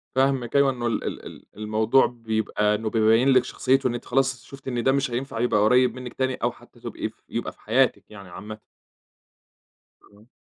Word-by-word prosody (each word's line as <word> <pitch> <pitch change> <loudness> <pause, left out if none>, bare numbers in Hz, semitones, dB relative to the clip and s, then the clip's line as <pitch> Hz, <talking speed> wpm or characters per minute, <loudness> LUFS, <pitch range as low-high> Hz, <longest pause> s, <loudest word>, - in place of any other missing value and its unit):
فاهمِك 130 -2 +1
أيوه 140 -1 +5
إنه 120 -2 -3
ال 115 - -1
ال - - -5
ال - - -11
الموضوع 110 +4 +2
بيبقى 110 -3 -1
إنه 110 +1 -3
بيبيّن 115 +4 +3
لِك 130 -2 +5
شخصيّته 135 0 +1
إن 120 - -1
أنتِ 120 - -6
خلاص 130 -1 0
شُفتِ 135 -1 -13
إن 120 -2 -2
ده 135 - +4
مش 135 -2 0
هينفع 120 -1 -4
يبقى 115 -3 +2
قريّب 125 +4 +4
منِك 125 -1 -8
تاني 130 -1 -1
أو - - -1
حتى - - -20
تبقي - - -5
ف - - -23 0.2
يبقي - - -3
في - - -28
حياتِك 125 +4 +2
يعني 100 -3 -12
عامةً. 105 +5 -8 1.4
إمم. 105 +2 -22
120 Hz, 195 wpm, -24 LUFS, 110-130 Hz, 1.4 s, أيوه